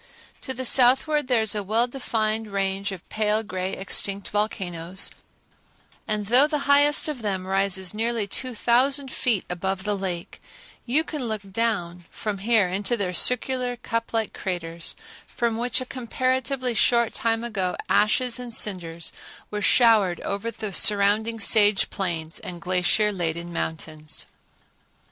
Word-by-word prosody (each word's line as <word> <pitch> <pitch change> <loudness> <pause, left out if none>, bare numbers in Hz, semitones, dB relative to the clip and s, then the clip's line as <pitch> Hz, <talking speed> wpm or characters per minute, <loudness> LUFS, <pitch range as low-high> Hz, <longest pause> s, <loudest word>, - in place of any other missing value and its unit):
To 265 - -5
the 260 +2 -4
southward 265 +4 +4
there 245 -3 +2
is 220 - 0
a 210 - -1
well 220 +4 +1
defined 225 -4 -2
range 195 0 -1
of 185 -3 -9
pale 215 0 0
gray 185 -2 -4
extinct 195 +1 0
volcanoes, 190 -4 -2 1.0
and 210 -1 -1
though 250 +7 +5
the 300 -2 -2
highest 290 +2 +4
of 295 -5 -4
them 190 -3 -2
rises 190 -1 0
nearly 225 0 -1
two 250 +5 -3
thousand 265 +4 +2
feet 225 -7 0
above 190 +2 -3
the 210 0 -1
lake, 185 -3 -5 0.5
you 290 +7 +2
can 300 -5 -5
look 215 -2 -3
down 190 -4 -2
from 210 -3 -4
here 215 -1 +3
into 200 +6 -1
their 185 -4 -2
circular, 250 +4 +2
cup 230 -1 -3
like 225 -2 -1
craters, 170 -3 -3 0.3
from 235 -2 -1
which 245 +3 0
a - - -4
comparatively 255 0 -1
short 235 +1 +3
time 225 0 -1
ago 195 -6 -2
ashes 240 +3 +2
and 240 -2 -4
cinders 170 -5 -1 0.4
were 210 0 -3
showered 215 -7 +4
over 200 +3 -3
the 215 -3 -5
surrounding 210 +3 +2
sage 210 -1 +5
plains 165 -4 -2
and 175 -1 -7
glacier 185 +4 +1
laden 170 -2 -3
mountains. 155 -2 -4
210 Hz, 145 wpm, -24 LUFS, 190-240 Hz, 1.0 s, though